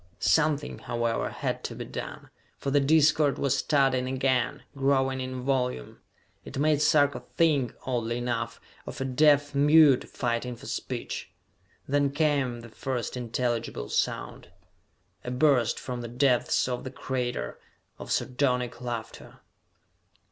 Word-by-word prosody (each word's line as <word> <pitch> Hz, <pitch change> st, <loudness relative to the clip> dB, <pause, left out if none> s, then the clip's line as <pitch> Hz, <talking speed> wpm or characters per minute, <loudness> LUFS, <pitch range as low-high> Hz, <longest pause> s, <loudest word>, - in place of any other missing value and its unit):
Something, 145 Hz, -, +1 dB
however, 120 Hz, -1 st, -1 dB
had -, -, -3 dB
to -, -, -5 dB
be -, -, -6 dB
done, -, -, -7 dB, 0.3 s
for 140 Hz, -, -3 dB
the 145 Hz, -, +4 dB
discord 150 Hz, 0 st, +4 dB
was 140 Hz, -2 st, +1 dB
starting 135 Hz, -3 st, +2 dB
again, 130 Hz, 0 st, 0 dB
growing 135 Hz, -1 st, +1 dB
in 130 Hz, -1 st, -5 dB
volume. 125 Hz, -, -1 dB, 0.4 s
It -, -, -8 dB
made 150 Hz, +1 st, +2 dB
Sarka 145 Hz, -3 st, +3 dB, 0.2 s
think, 145 Hz, -7 st, +2 dB
oddly 120 Hz, -2 st, -1 dB
enough, 120 Hz, 0 st, -3 dB, 0.3 s
of -, -, -7 dB
a 135 Hz, -, -1 dB
deaf 145 Hz, +2 st, +3 dB
mute 145 Hz, -1 st, +5 dB
fighting 120 Hz, 0 st, -2 dB
for -, -, -13 dB
speech! -, -, -5 dB, 0.6 s
Then 140 Hz, 0 st, +2 dB
came 140 Hz, -5 st, 0 dB
the 120 Hz, -, -11 dB
first 125 Hz, +1 st, -4 dB
intelligible 120 Hz, -, -2 dB
sound.... -, -, -2 dB, 0.7 s
A -, -, -5 dB
burst, 125 Hz, -2 st, +2 dB
from 125 Hz, -1 st, -5 dB
the 120 Hz, -, -5 dB
depths 125 Hz, +1 st, +2 dB
of 125 Hz, -1 st, -3 dB
the 130 Hz, -, -5 dB
crater, 125 Hz, -, -3 dB, 0.4 s
of -, -, -7 dB
sardonic 125 Hz, -2 st, 0 dB
laughter! 120 Hz, -3 st, -6 dB
130 Hz, 135 wpm, -27 LUFS, 125-140 Hz, 0.7 s, mute